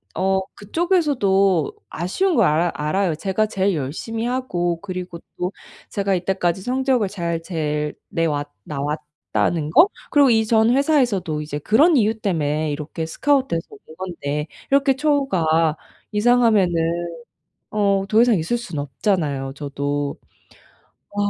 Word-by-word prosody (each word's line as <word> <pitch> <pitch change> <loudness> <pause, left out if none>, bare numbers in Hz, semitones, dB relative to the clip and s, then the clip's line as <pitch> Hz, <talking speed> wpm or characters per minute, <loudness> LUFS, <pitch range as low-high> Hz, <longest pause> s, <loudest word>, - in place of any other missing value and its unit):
어 190 0 +2 0.2
그쪽에서도 205 - +1 0.2
아쉬운 325 - 0
거 230 - +4
알아 170 0 +2
알아요. 165 +3 0
제가 195 +6 0
제일 195 -2 0
열심히 165 - -4
하고 180 -10 -1
그리고 180 -3 -6 0.2
또 180 +1 -2 0.4
제가 200 -1 0
이때까지 180 0 -1
성적을 255 -2 +1
잘 170 -4 -3
제일 150 -3 -2
내왔 150 -3 -1
나왔다는 150 -1 -2
거? 355 - +7 0.2
그리고 285 -2 +5
이 220 -2 +3
전 220 0 +3
회사에서도 245 - +1
이제 150 -1 -5
그런 290 - +4
이유 220 -1 +2
때문에 155 -6 0
이렇게 150 +2 -4
스카우트돼서 260 - 0
온 160 - -14
건데 150 -5 -4 0.2
이렇게 275 -1 +4
처우가 185 - +2 0.4
이상하면은 215 -4 +3 1.0
어 200 -2 +1
더 220 +2 +4
이상 240 -3 +4
있을 170 +10 -1
순 185 -10 -6
없잖아요, 140 - -1
저도. 145 0 -3 0.9
아 - - -17
185 Hz, 290 characters per minute, -21 LUFS, 155-225 Hz, 1.0 s, 거